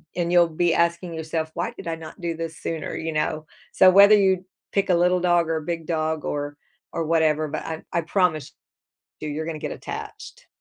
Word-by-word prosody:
and 175 -1 -1
you'll 175 -1 +6
be 165 +1 +1
asking 170 0 0
yourself, 160 0 -3
"Why - - -2
did - - -9
I 165 - -1
not 165 +4 -11
do 170 -1 -2
this 165 -1 -5
sooner?" 160 -2 -4
You 160 0 -3
know? 155 0 -1 0.3
So, 185 - +7
whether 200 +2 +8
you, 190 -2 +2 0.3
pick 200 -1 0
a 180 - +5
little 180 +1 +3
dog 175 -2 +2
or 160 - +1
a - - -4
big 165 -1 -4
dog 160 -1 -1
or 145 0 -3 0.4
or 165 - -2
whatever, 155 -1 +2
but 155 +1 -4
I 160 0 -5
I 170 - +2
promise 165 -4 0 0.7
you 155 - -4
you're 155 +2 -3
gonna 160 -2 -5
get - - -4
attached. - - -8
165 Hz, 210 wpm, -24 LUFS, 155-175 Hz, 0.7 s, whether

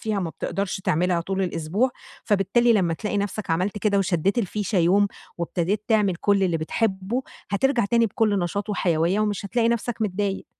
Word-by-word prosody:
فيها 215 -3 -1
ما 165 -3 -3
بتقدرش 195 +2 -3
تعملها 175 0 +1
طول 195 +2 -2
الأسبوع، 180 +8 0 0.3
فبالتالي 225 +3 +3
لمّا 175 -6 +2
تلاقي 210 +3 -3
نَفسك 205 0 -3
عملت 185 +5 0
كده، 200 -1 +2
وشدّيت 195 +2 +1
الفيشة 205 -1 -1
يوم 190 +4 +4 0.3
وابتديت 175 +4 -1
تعمل 210 -5 +2
كلّ 200 +2 +2
اللي 175 -3 +2
بتحبه، 195 +7 -1 0.3
هاترجع 235 +3 +2
تاني 230 +2 +3
بكُلّ 210 0 +1
نشاط 190 +4 -2
وحيوية 175 +1 +1
ومش 205 -2 -1
هاتلاقي 230 +3 +1
نَفسك 235 0 -1
متضايق. 200 -1 -2
200 Hz, 165 wpm, -24 LUFS, 180-215 Hz, 0.3 s, يوم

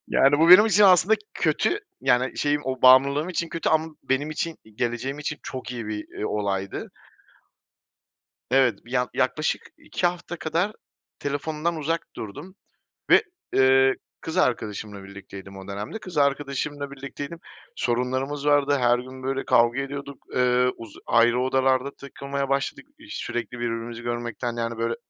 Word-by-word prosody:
yani, 140 +2 +4
bu 165 +1 +5
benim 205 +5 +10
için 210 -1 +4
aslında 195 +2 +6 0.2
kötü, - - +1 0.2
yani, 125 +1 +2
şeyim, 145 0 +1
o 130 -1 -3
bağımlılığım 140 +5 +6
için 170 -2 -2
kötü 165 - -2
ama 160 0 +1
benim 140 +3 -1
için, 160 +1 -3 0.2
geleceğim 120 +5 -2
için 150 0 -4
çok 130 -1 -6
iyi 115 -3 -5
bir, 105 -1 -4
iii, 105 - -1
olaydı. 100 - -2 1.6
Evet, 125 -6 +3
bir 120 - -15
yak 125 -3 +1
yaklaşık - - 0 0.2
2 175 - -1
hafta 175 0 -3
kadar 170 +6 0 0.5
telefondan 155 +3 -2
uzak 160 +2 -2
durdum 140 - -8 0.6
ve, - - +7 0.3
ııı, 130 0 +5 0.3
kız 160 - -6
arkadaşımla 105 -4 -1
birlikteydim 100 0 -11
o 95 0 -10
dönemde, 105 - -5
kız 180 -6 -10
arkadaşımla 140 0 0
birlikteydim. 140 +4 -7 0.4
Sorunlarımız 130 +4 -1
vardı, 145 -1 +4
her 120 0 +4
gün, 130 +1 -9
böyle, 135 +1 -2
kavga 120 +3 +3
ediyorduk, 140 0 -7
ııı, 125 0 +3
uzu 115 -3 -11
ayrı 120 +1 +4
odalarda 130 +1 +2
takılmaya 140 0 -5
başladık. 140 - -1
İş 310 0 -9
sürekli 120 0 -4
birbirimizi 115 0 -4
görmekten, 120 0 -3
yani, 115 0 -3
böyle, 115 0 0
135 Hz, 145 wpm, -25 LUFS, 120-145 Hz, 1.6 s, benim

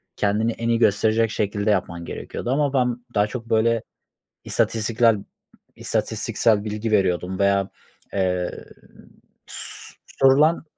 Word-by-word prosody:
kendini 105 +3 +1
en 115 +1 -3
iyi 115 -1 +2
gösterecek 110 +1 +2
şekilde 105 0 -1
yapman 85 -3 -2
gerekiyordu 120 - -5
ama 140 0 +1
ben 125 -2 +1 0.2
daha 105 0 +3
çok 115 0 -7
böyle 115 0 +2 0.6
istatistiklel 115 0 +2 0.6
istatistiksel 110 -3 0
bilgi 105 +1 -3
veriyordum 95 -2 +1
veya, 100 -1 +2 0.4
eee, 90 -2 -1 0.8
s - - -9 0.3
sorulan 145 +6 +5
110 Hz, 110 wpm, -23 LUFS, 100-115 Hz, 0.8 s, sorulan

